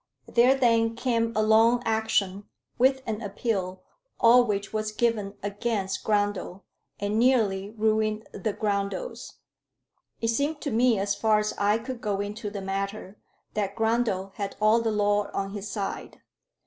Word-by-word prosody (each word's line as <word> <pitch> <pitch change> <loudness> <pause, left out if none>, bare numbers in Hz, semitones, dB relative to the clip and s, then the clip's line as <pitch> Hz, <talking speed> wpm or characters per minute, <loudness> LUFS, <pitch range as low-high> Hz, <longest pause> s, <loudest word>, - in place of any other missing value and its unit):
There 250 +3 +4
then 230 -3 +2
came 230 -2 0
on 230 - -8
a 215 0 +2
long 225 +3 +4
action, 215 -3 0 0.3
with 265 +1 +3
an 220 0 -3
appeal, 195 -3 -3 0.4
all 240 +2 +7
which 205 -3 -3
was 215 0 -2
given 215 -3 -1
against 205 -1 -2
Grundle, 205 -2 -1 0.4
and 205 +2 -1
nearly 215 -6 +2
ruined 215 0 0
the 205 +2 -3
Grundles. 205 - -3 0.9
It 230 - -1
seemed 285 +6 0
to 285 - -3
me, 235 0 +3
as 200 +1 0
far 215 +1 +2
as 210 0 -1
I 205 +2 +2
could 240 +1 -7
go 205 -2 -1
into 205 +1 -4
the 200 -1 -6
matter, 195 +1 -4 0.3
that 200 -2 -2
Grundle 225 -4 0
had 200 -1 -4
all 215 +2 +4
the 230 - 0
law 205 -1 +1
on 195 0 -2
his 205 0 -6
side. 200 -3 -5
215 Hz, 155 wpm, -26 LUFS, 200-230 Hz, 0.9 s, all